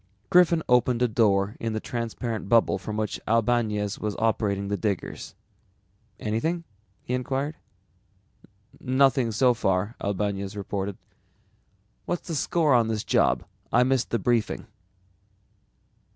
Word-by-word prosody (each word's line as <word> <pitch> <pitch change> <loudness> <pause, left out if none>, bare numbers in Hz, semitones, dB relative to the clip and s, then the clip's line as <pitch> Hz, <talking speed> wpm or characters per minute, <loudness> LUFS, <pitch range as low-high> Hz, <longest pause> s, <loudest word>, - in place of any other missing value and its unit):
_ - - -41
Griffin 175 -2 +5
opened 125 0 +3
a - - +4
door 105 -3 +2
in 115 -1 -2
the 110 - -1
transparent 115 -2 -4
bubble 115 -4 +4
from 105 +3 -5
which 110 -1 -2
Albañez 110 -2 +1
was 105 -1 -3
operating 105 -3 0
the 100 - -1
diggers. 100 -3 -4 0.8
"Anything?" 160 +11 -1 0.4
he 125 - -4
inquired. 135 +4 -2 1.2
"Nothing 130 -2 +2
so 125 +3 +4
far," 105 0 0
Albañez 100 0 -2
reported. 100 -1 -4 1.1
"What's 175 - -3
the 170 - -3
score 155 -1 +2
on 120 -2 +4
this 110 -2 -2
job? - - +2 0.3
I 120 - +5
missed 130 -1 +1
the 115 - +1
briefing." 115 -2 0
115 Hz, 125 wpm, -26 LUFS, 105-125 Hz, 1.2 s, Griffin